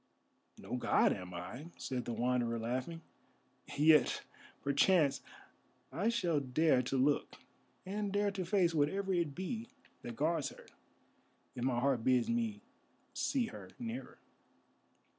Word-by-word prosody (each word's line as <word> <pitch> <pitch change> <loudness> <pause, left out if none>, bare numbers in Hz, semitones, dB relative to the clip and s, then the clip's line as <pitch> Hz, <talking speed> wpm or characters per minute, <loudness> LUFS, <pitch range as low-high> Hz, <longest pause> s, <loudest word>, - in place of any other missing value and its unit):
"No - - -5
god - - +3
am 90 0 -7
I," 95 - -7
said 125 -2 -3
the 120 - -3
Wanderer, 120 0 0
laughing, 130 +8 -3 0.8
"yet, 150 -2 +5 0.4
perchance, 140 +1 +3 0.7
I 180 - 0
shall 175 -10 +1
dare 135 +1 +3
to 130 +2 -2
look, 140 +3 +1 0.5
and 205 +1 -2
dare 205 0 +1
to 195 -2 -3
face 180 -2 +2
whatever 190 +6 +1
it 170 -6 0
be 220 +5 -4 0.3
that 120 - -7
guards 155 +1 0
her, - - -14 0.9
if 120 - -5
my 125 -2 +1
heart 130 -2 +1
bids 130 - +3
me 225 -3 -1 0.5
see 260 -4 0
her 225 - -9
nearer." 240 +1 -6
150 Hz, 130 wpm, -34 LUFS, 125-195 Hz, 0.9 s, yet